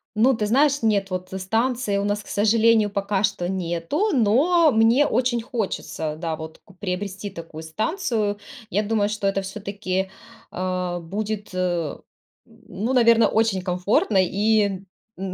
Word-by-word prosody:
Ну, 250 +5 +4
ты 215 -2 -1
знаешь, 280 +5 +3
нет. 200 -3 +2
Вот 185 0 -4
станции 225 +2 0
у 200 - 0
нас, 205 +1 -1
к - - -19
сожалению, 220 +1 +3
пока 200 0 -1
что 195 -4 0
нету, 185 - -1
но 285 - +4
мне 230 +6 +4
очень 245 -2 +1
хочется, 195 - -3
да 165 -1 -3
вот, 160 0 -9
ку 195 - -18
приобрести 195 +1 -4
такую 165 -3 -9
станцию. 215 - -1 0.3
Я 210 +1 0
думаю, 205 -1 +1
что 210 -2 -2
это 195 0 0
всё-таки, 195 -1 -3 0.4
а, 180 -1 -2
будет, 205 +3 -4
э, - - -5 0.9
м, 225 0 -22
ну, 225 +5 -2
наверно, 230 -2 +5
очень 220 -4 +1
комфортно 185 +3 +1
и, 200 0 +1 0.4
м, 190 -1 -4
205 Hz, 150 wpm, -23 LUFS, 185-225 Hz, 0.9 s, наверно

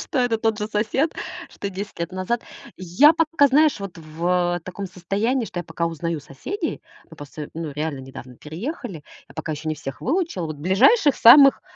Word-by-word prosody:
что - - -3
это 245 -3 +2
тот 220 -1 0
же 210 - -2
сосед, 220 +9 0 0.4
что 200 - -6
10 200 0 -7
лет 170 +2 -3
назад. 190 +6 -2 0.3
Я 185 - +5
пока, 320 -2 +3
знаешь, 300 -2 +3
вот 195 -3 -7
в, 160 +1 -8 0.3
а, 175 - -6
таком 185 +3 -7
состоянии, 205 +8 -1
что 175 - -5
я - - -9
пока 165 +1 -2
узнаю 165 -1 -3
соседей. 150 - -5 0.3
Мы - - -13
просто, 145 +1 -8
ну, 160 -1 -5
реально 150 -1 -3
недавно 130 -2 -11
переехали. 195 - -6 0.3
Я - - -17
пока 155 - -4
ещё 155 +1 -5
не 155 - -1
всех 135 -3 -8
выучила. 320 - -1
Вот 155 -1 -6
ближайших 255 - +4
самых- 275 +6 +8
185 Hz, 190 wpm, -22 LUFS, 160-250 Hz, 0.4 s, самых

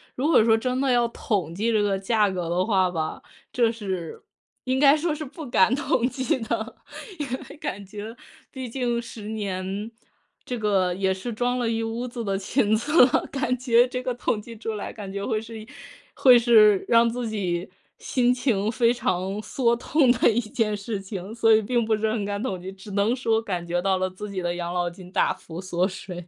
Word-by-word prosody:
如 265 +4 0
果 315 -8 +5
说 225 0 +4
真 255 +3 -1
的 275 -1 +2
要 240 -1 +3
统 195 -8 -2
计 220 +5 0
这 215 -2 +2
个 200 -1 +1
价 210 +1 +2
格 180 -3 -3
的 180 +2 +1
话 190 -4 +2
吧， 160 -2 -3 0.3
这 235 -2 +3
是 190 -7 -5 0.4
应 260 0 0
该 280 +2 +6
说 310 0 -1
是 310 - -5
不 305 +3 -9
敢 205 0 +4
统 260 -3 +1
计 260 -1 -1
的， 225 0 -3 0.4
因 295 - -1 0.2
为 - - -10
感 205 - -5
觉 210 +3 -8 0.4
毕 260 -2 -6
竟 240 -1 -1
10 225 -2 -9
年， 200 -1 -4 0.5
这 250 - -4
个 195 -5 +1
也 190 0 +1
是 190 +6 -5
装 245 +2 -1
了 235 -2 0
一 225 0 -1
屋 225 +2 -3
子 235 -1 -5
的 195 -1 0
裙 215 +2 +1
子 290 +5 +5
了。 250 - +1
感 255 -2 -1
觉 245 -1 +4
这 250 0 -4
个 255 -1 -1
统 235 -3 -1
计 230 +1 -11
出 225 +1 -4
来 210 - -5
感 200 -3 -8
觉 200 0 -4
会 220 -3 -1
是 220 -1 -9 0.5
会 255 -2 +7
是 215 -4 +5
让 235 0 +5
自 235 0 -3
己 185 -4 -2 0.3
心 250 -1 +2
情 225 -5 0
非 235 0 +3
常 195 -4 -1
缩 235 -1 +1
痛 260 +2 +3
的 245 -1 +4
一 225 - +1
件 215 -2 -1
事 205 +1 -4
情， 195 +1 -7
所 225 -1 +4
以 220 - +5
并 235 +2 0
不 220 0 +2
是 215 0 0
很 215 -2 -2
敢 200 0 -3
统 195 -7 -3
计， 185 +2 -7
只 195 +2 -13
能 205 +4 +1
说 225 -3 +1
感 185 -6 -4
觉 175 +1 0
到 190 +1 +1
了 185 0 0
自 200 +3 -8
己 190 -2 -3
的 175 0 -2
养 175 0 -4
老 175 -1 0
金 180 +1 -13
大 - - +2
幅 170 +2 -9
缩 180 -1 0
水。 180 -2 -8
220 Hz, 230 characters per minute, -25 LUFS, 195-240 Hz, 0.5 s, 会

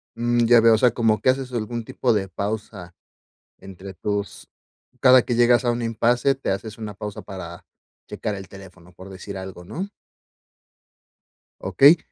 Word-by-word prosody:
Mm, 120 0 +1
ya 120 0 +6
veo, 115 0 +6
o 110 - +4
sea, 125 +1 +4
como 115 -2 +1
que - - +3
haces 130 0 0
algún 120 0 -4
tipo 120 +2 0
de 100 -3 -1
pausa 100 -2 -5 0.6
entre 95 0 -10
tus 100 +1 -4 0.5
cada 130 -1 +7
que 120 - -2
llegas 120 0 +4
a 120 - +3
un 120 0 -3
impase, 120 +4 +1
te 135 - -3
haces 105 +3 -5
una 105 -2 -6
pausa 105 +1 -7
para 85 -3 -9 0.4
checar 105 - -4
el 95 -1 -9
teléfono, 95 -2 -15
por 95 +2 -12
decir 95 +1 -8
algo, 95 -2 -9
¿no? 190 - -5 1.7
Okey, 145 +5 +6
110 Hz, 165 wpm, -23 LUFS, 95-120 Hz, 1.7 s, cada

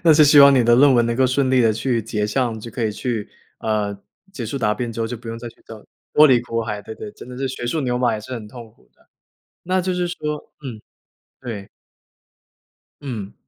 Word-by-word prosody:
那 160 - +7
是 150 0 +7
希 145 +1 +6
望 140 0 +9
你 125 - +4
的 120 0 +5
论 140 +2 +6
文 120 -1 +4
能 120 0 -1
够 130 - +4
顺 130 +1 +1
利 130 -1 +4
地 115 -2 +4
去 115 +2 0
结 105 -1 -2
项， 115 0 -1
就 115 +2 -9
可 115 +1 -3
以 110 - +1
去 115 -3 -3 0.3
呃， 105 -2 -1 0.4
结 120 -10 -5
束 140 - -4
答 105 -4 +1
辩 120 -2 -4
之 115 - -5
后， 115 - 0
就 120 +1 -5
不 115 +1 -11
用 115 0 -5
再 120 0 -7
去 - - -17
找 110 -2 -11 0.3
脱 150 - +8
离 130 -4 +5
苦 115 -1 -3
海， 105 -2 -4
对 110 - -8
对， 210 - -8
真 - - -12
的 125 - -8
是 135 0 -2
学 125 -2 -5
术 155 +6 -1
牛 125 -2 -1
马 120 -2 +2
也 110 - -4
是 130 +5 -10
很 115 -4 -5
痛 115 -1 -11
苦 110 - -29
的。 - - -30 0.6
那 185 +1 +1
就 185 0 -1
是 180 -1 -1
说 150 -3 -5
嗯， 115 -5 -6 0.6
对。 110 -6 -7 1.3
嗯。 110 -8 -6
120 Hz, 265 characters per minute, -21 LUFS, 110-135 Hz, 1.3 s, 望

